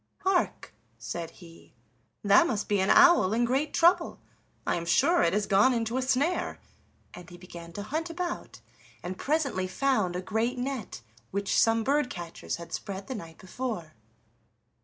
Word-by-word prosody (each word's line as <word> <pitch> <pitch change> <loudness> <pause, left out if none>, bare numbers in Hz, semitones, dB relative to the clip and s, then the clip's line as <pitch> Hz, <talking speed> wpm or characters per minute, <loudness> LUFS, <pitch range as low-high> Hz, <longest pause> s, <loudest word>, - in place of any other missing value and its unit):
"Hark!" 380 -2 0 0.2
said 170 -1 -5
he, 170 -2 -16 0.5
"that 205 +11 +5
must 210 -5 -2
be 205 -1 +1
an 190 - +1
owl 345 - +6
in 240 +2 +2
great 270 +5 0
trouble, 345 +2 +3 0.5
I - - +1
am 170 - -4
sure - - +3
it 170 - +3
has 210 0 +1
gone 205 +7 +4
into 230 0 -2
a 260 - +1
snare"; 275 +7 0 0.5
and 180 -1 -11
he 175 - -12
began 170 -1 -11
to 205 - -5
hunt 315 +10 -3
about, 345 +1 -5 0.4
and 180 +1 -4
presently 275 -8 -1
found 210 -3 0
a 180 - -2
great 225 +5 -1
net 250 - -5 0.3
which 200 0 -1
some 225 0 +3
bird 280 +1 +1
catchers 170 -2 -6
had 170 0 -10
spread 195 0 -5
the 260 - -5
night 165 -8 -9
before. 190 -6 -5
215 Hz, 165 wpm, -28 LUFS, 185-270 Hz, 0.5 s, owl